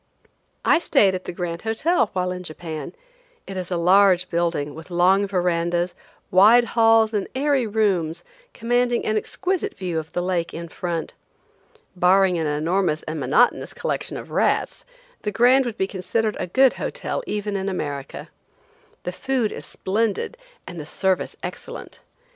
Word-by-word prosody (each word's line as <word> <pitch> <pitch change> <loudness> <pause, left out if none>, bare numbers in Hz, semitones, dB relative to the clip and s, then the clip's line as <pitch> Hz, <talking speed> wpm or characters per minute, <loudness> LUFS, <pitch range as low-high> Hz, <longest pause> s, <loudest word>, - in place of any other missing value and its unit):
I 325 - +5
stayed 210 - +3
at 185 0 -5
the - - -4
Grand 170 -1 -4
Hotel 225 - +1
while 180 -1 -1
in 180 0 -5
Japan. 160 - -7 0.5
It 195 - -7
is 185 -2 -4
a 180 - -1
large 180 +1 +4
building, 170 -4 -1
with 160 +3 -11
long 185 +3 +3
verandas, 175 -1 0 0.4
wide 215 +6 +7
halls 225 -1 +4
and 205 -2 -1
airy 275 -3 +1
rooms, 185 -6 0 0.3
commanding 245 +1 0
an 215 - 0
exquisite 380 - -2
view 175 -4 -2
of 155 0 -9
the 175 - -1
lake 180 -2 -1
in 170 0 -6
front. 170 -2 -4 0.8
Barring 180 0 +4
an 160 - -1
enormous 155 +2 0
and 155 0 -5
monotonous 145 - +2
collection - - -3
of - - -9
rats, - - 0 0.4
the 210 - -2
Grand 250 +5 +4
would 230 - -5
be 190 - +1
considered 205 +3 -2
a - - -2
good 260 +7 +4
hotel - - -3
even 210 -1 -3
in 195 0 -1
America. 145 -7 -5 0.7
The 180 - -3
food 250 +2 -1
is - - -5
splendid 215 - -1 0.3
and 175 -2 -8
the 150 - -6
service 190 +2 0
excellent. - - -8
190 Hz, 155 wpm, -23 LUFS, 175-225 Hz, 0.8 s, wide